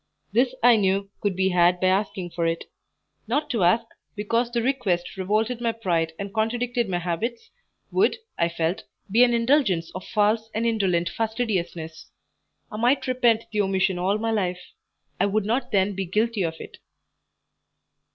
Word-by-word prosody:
This 250 +3 +2
I 240 -1 +7
knew 195 0 0
could 200 -3 -1
be 190 +1 +2
had 175 0 +3
by 185 - 0
asking 190 -2 -1
for 170 -1 -1
it; 165 0 -1 0.6
not 300 +1 -1
to 225 -7 +1
ask, 220 +7 +3 0.3
because 230 +3 0
the 235 -1 0
request 205 -11 -1
revolted 215 +5 -1
my 230 -1 +1
pride 170 -7 -1
and 200 0 -6
contradicted 235 +1 0
my 180 - 0
habits, 180 +8 -3 0.4
would, 420 +4 +3 0.2
I 170 0 +1
felt, 170 +1 -2 0.3
be 235 +4 +6
an 240 -1 +3
indulgence 230 - +2
of 185 - -6
false 215 +1 +1
and 225 +2 0
indolent 190 -7 +1
fastidiousness. 190 -8 -3 0.6
I 215 - -6
might 245 +5 +2
repent 240 -3 +2
the 210 -1 +1
omission 190 -2 +1
all 190 +3 +1
my 225 +1 -1
life; 180 -4 -2 0.5
I - - +3
would 205 0 0
not 235 +5 -1
then 200 0 +2
be 195 0 -3
guilty 215 +4 0
of 165 -2 -1
it. - - -11
210 Hz, 165 wpm, -24 LUFS, 180-230 Hz, 0.6 s, I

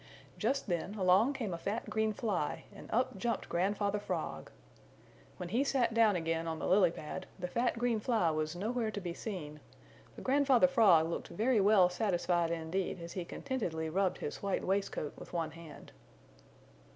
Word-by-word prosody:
Just 265 +5 0
then 185 +2 -2
along 195 +7 +4
came 225 -9 -3
a 170 - -4
fat 210 +6 -3
green 220 0 0
fly 200 -8 -2
and - - -12
up 230 -4 0
jumped 235 +3 -1
Grandfather 200 +3 0
Frog. 160 - -4 0.9
When 180 - -5
he 240 +8 +2
sat 255 -5 +1
down 225 -3 +4
again 165 -1 -1
on 160 -1 -2
the - - -4
lily 185 -2 +5
pad 165 +3 -7
the 180 -2 -3
fat 235 +5 0
green 235 -2 +1
fly 215 -7 +2
was 155 +1 -2
nowhere 225 +4 -1
to 210 - -4
be 175 -3 -4
seen, 160 -8 -6 0.6
but - - -9
Grandfather 275 -1 +4
Frog 210 -12 +5
looked 170 - -4
very 225 +3 +2
well 195 -2 +6
satisfied 175 -3 0
indeed 170 +3 -2
as 170 0 -7
he 185 - -3
contentedly 170 -7 -3
rubbed 190 +1 +1
his - - -5
white 200 -1 -1
waistcoat 190 -6 -1
with - - -11
one 165 -2 -1
hand. 165 -2 -12
195 Hz, 175 wpm, -33 LUFS, 170-225 Hz, 0.9 s, well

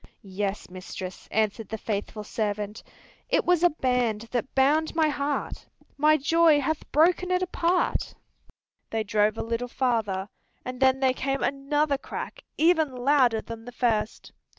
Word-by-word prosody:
"Yes, 195 +1 -3
mistress," 185 0 -8
answered 215 0 -1
the 220 - -4
faithful 210 0 -4
servant, 210 0 -3 0.5
"It - - +2
was 355 -2 +3
a 350 - +6
band 250 -7 0
that 250 +1 -3
bound 300 +5 +3
my 320 -2 +3
heart. 285 -1 -3 0.3
My 305 +1 +4
joy 320 +1 +4
hath 305 +2 -3
broken 350 +4 +3
it 365 0 +1
apart." 355 0 0 0.7
They 225 -1 -1
drove 210 +1 +1
a - - -2
little 230 +2 -2
farther, 220 -7 -1 0.4
and 255 0 -6
then 265 0 +3
there 260 -1 +3
came 270 +1 -2
another 280 +1 0
crack, - - -7
even 320 -4 +3
louder 250 -3 +3
than 230 -1 -9
the 245 - -8
first. 230 -3 -1
255 Hz, 150 wpm, -26 LUFS, 220-300 Hz, 0.7 s, a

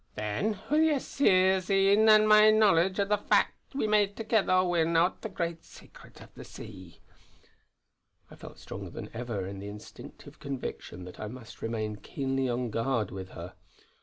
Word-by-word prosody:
Then, 185 - -2
wi' 300 - +4
your 300 -3 +2
Seer's 190 -8 +2
een 200 +3 +4
an' 215 0 +7
my 215 0 +7
knowledge 195 -4 +3
o' 200 - +2
the 205 0 0
fact 235 - 0
we 275 - 0
may 210 -1 +3
thegither 205 -3 +1
win 170 -1 +1
oot 175 +3 +1
the 220 - -5
great 170 -3 -4
Secret - - -16
o' - - -14
the - - -11
Sea." 95 -5 -12 1.3
I - - -11
felt - - -12
stronger - - -8
than - - -9
ever 115 -4 -4
the 100 +1 -8
instinctive 105 +1 -12
conviction 135 -9 -6
that 90 - -12
I 105 - -5
must 115 0 -11
remain 110 -2 -3
keenly 135 +4 -3
on 120 -1 -2
guard 115 -2 -1
with 95 0 -7
her. 85 +2 -8
165 Hz, 165 wpm, -28 LUFS, -, 1.3 s, an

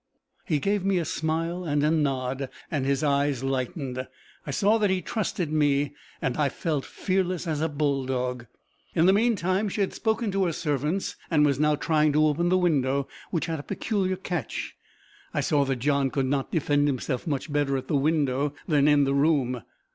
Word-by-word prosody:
He 155 -7 +1
gave 200 +6 0
me 195 -1 +2
a 170 - 0
smile 165 +4 -2
and 145 -3 0
a 150 - +3
nod, 135 -3 0 0.2
and 140 -4 -1
his 140 +1 +1
eyes 140 -2 +1
lightened. 130 0 -2 0.4
I - - -4
saw 210 +10 +3
that 205 -2 +2
he 190 0 +1
trusted 180 -4 -2
me, 145 -2 +2 0.3
and 125 - 0
I 145 -2 +2
felt 150 0 -2
fearless 185 -2 -1
as 155 -3 -1
a 160 - +1
bull 140 -3 0
dog. 125 -2 -2 0.5
In 165 - +4
the 190 - +6
meantime, 205 -2 +1
she 205 - -2
had 195 - 0
spoken 220 -1 0
to 195 0 +1
her 170 - 0
servants, 150 +4 -1
and 150 -3 +4
was 140 -2 +1
now 150 0 +3
trying 155 0 +2
to 155 +1 +4
open 160 +3 +1
the 185 - +4
window, 140 -6 +1 0.2
which 165 -2 -1
had 165 -2 -3
a - - -4
peculiar 195 +2 -1
catch. 175 - -4 0.6
I - - +2
saw 145 -2 +2
that 135 0 0
John 140 +2 +1
could 135 0 -1 0.2
defend 145 -2 +2
himself 130 -1 -2
much 145 0 -2
better 145 -2 +1
at 130 - -6
the 155 - 0
window 145 -1 +1
than 150 -4 +3
in 145 -1 +5
the 135 0 +1
room. 140 -4 +2
150 Hz, 195 wpm, -26 LUFS, 140-175 Hz, 0.6 s, the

